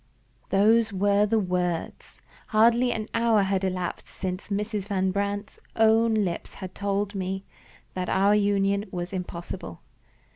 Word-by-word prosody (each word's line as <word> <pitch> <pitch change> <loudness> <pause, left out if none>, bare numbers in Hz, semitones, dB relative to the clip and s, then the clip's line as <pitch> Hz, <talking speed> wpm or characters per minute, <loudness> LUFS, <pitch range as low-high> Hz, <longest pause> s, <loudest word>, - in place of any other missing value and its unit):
Those 220 +3 +4
were 200 +1 +2
the 225 +2 +2
words! 180 -4 -2 0.3
Hardly 235 +3 +4
an 220 -2 -3
hour 230 -3 +3
had 195 0 0
elapsed 180 -2 -3
since 185 0 -5
Mrs. 205 0 -2
Van 190 -2 0
Brandt's 200 +1 -3 0.2
own 225 0 +4
lips 190 -6 -2
had 185 -1 -8
told 200 0 -1
me 190 0 -3 0.5
that 180 -1 -3
our 200 +2 +3
union 200 -1 +2
was 175 +1 -5
impossible. 175 - -6
200 Hz, 135 wpm, -26 LUFS, 185-215 Hz, 0.5 s, Those